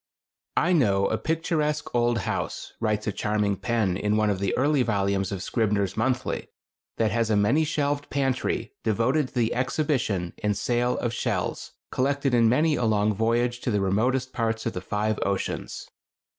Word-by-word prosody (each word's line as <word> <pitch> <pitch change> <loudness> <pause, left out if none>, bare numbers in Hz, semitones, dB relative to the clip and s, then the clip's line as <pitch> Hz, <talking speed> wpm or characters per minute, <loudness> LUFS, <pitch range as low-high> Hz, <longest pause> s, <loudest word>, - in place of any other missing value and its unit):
] - - -25
I 180 +2 +3
know 100 - +3
a 110 - +1
picturesque 155 -2 -1
old 120 -1 +2
house - - -3
[writes 105 -2 0
a 105 - 0
charming 105 0 0
pen 110 -5 0
in 105 +1 +1
one 105 -1 +2
of 95 - -2
the 100 -1 -1
early 145 +2 +3
volumes 100 -4 0
of 95 -2 -4
"Scribner's 105 -5 0
Monthly"] 125 +2 -1 0.5
that 110 -2 +2
has 115 0 +1
a 110 - +3
many 105 +10 +3
shelved 145 -1 -1
pantry 130 -4 -1
devoted 120 +7 +1
to - - -22
the 120 -2 +1
exhibition 125 - -1
and 105 -1 +1
sale 120 0 0
of 120 -1 -2
shells, - - -2 0.2
collected 140 0 0
in 115 -2 +5
many 155 +6 +3
a 125 - 0
long 105 -1 +2
voyage 120 +3 +1
to - - -2
the 105 -3 +1
remotest 120 +7 0
parts 115 -1 -1
of 115 - -1
the 90 - -4
five 105 +3 -1
oceans. 100 -1 -3
115 Hz, 175 wpm, -26 LUFS, 105-130 Hz, 0.5 s, in